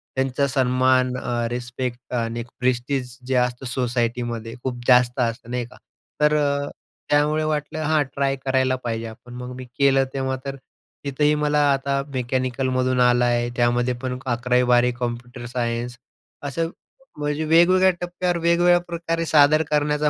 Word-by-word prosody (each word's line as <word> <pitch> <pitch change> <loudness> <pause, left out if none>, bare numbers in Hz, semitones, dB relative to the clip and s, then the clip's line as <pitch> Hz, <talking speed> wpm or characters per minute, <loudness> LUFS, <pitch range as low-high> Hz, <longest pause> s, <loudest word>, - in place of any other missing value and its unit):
त्यांचा 135 +1 +1
सन्मान, 130 0 +2
अ, 120 -2 -2
रिस्पेक्ट 125 +1 -5
आणि 115 -1 -2 0.2
प्रेस्टीज 125 0 -1
जे 130 - 0
असतं 125 +1 0
सोसायटीमध्ये 120 -2 -2
खूप 125 -2 -3
जास्त 125 0 +4
असतं 115 0 -2
नाही 125 -1 -2
का. 120 - -16 0.4
तर 150 0 +4
अ, 140 -1 0 0.4
त्यामुळे 150 +1 +2
वाटलं 155 0 -2
हां, 155 0 +2
ट्राय 135 0 -1
करायला 130 -1 +2
पाहिजे 115 -1 -3
आपण. 120 +2 -12
मग 125 0 -7
मी 130 - -8
केलं. 135 +2 +2
तेव्हा 130 -1 -1
तर 135 0 -4 0.5
तिथंही 150 +2 +2
मला 150 0 +1
आता 140 0 -1
मेकॅनिकलमधून 130 0 0
आला 125 0 +4
आहे. 120 0 +1
त्यामध्ये 120 +1 +2
पण 130 -1 -3
11वी-12वी 125 0 +2
कॉम्प्युटर 120 0 -5
सायन्स. 120 0 -3 0.5
असं 165 +4 -2 0.5
म्हणजे 150 +1 -1
वेगवेगळ्या 185 +4 +5
टप्प्यावर 175 0 -1
वेगवेगळ्याप्रकारे 170 -1 +1
सादर 155 0 +5
करण्याचा 150 0 +1
130 Hz, 135 wpm, -23 LUFS, 120-145 Hz, 0.5 s, वेगवेगळ्या